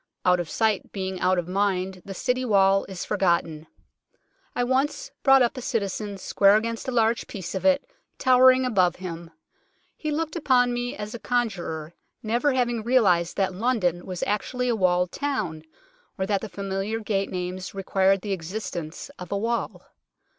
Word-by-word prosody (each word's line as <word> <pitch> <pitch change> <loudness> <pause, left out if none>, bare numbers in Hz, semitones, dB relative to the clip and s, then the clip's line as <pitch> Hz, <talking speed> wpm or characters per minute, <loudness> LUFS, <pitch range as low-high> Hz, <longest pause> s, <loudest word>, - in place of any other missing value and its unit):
Out 180 -1 +4
of 175 - -4
sight 220 -3 0
being 190 -2 -4
out 185 +1 +2
of 175 -1 -2
mind, 190 -1 -1
the 195 - -8
City 250 +6 0
Wall 195 -4 +3
is 190 -2 -6
forgotten. 170 -5 0 0.9
I 245 - +1
once 270 - 0
brought 270 -1 +6
up 240 - 0
a - - -4
citizen 205 -3 -2
square 195 +1 +4
against 230 +2 -1
a - - -1
large 230 -1 +1
piece 190 -4 -6
of 190 - -4
it, 280 0 +3 0.3
tower 255 0 +6
ing 255 0 +3
above 185 -8 +2
him. 170 -2 -7 0.7
He 305 - -4
looked 315 +1 -2
upon 250 -6 +3
me 245 0 -3
as 210 0 -6
a 235 - -6
con 245 -1 +1
jurer, 160 -4 -6 0.3
never 240 +6 +1
having 240 -3 0
realized 200 -8 +2
that 190 -1 +1
London 185 -5 0
was 185 -2 -4
actually 250 +5 -1
a 235 - +2
walled 180 -3 +2
town, 200 - -3 0.5
or 190 - -1
that 200 -1 0
the 220 - -6
familiar 195 +3 -3
gate 200 -3 -1
names 185 +1 -5
required 195 0 +2
the 200 0 -2
existence 175 -2 -5
of 180 -2 -8
a 200 - 0
wall. 230 +3 -2
200 Hz, 175 wpm, -25 LUFS, 185-245 Hz, 0.9 s, brought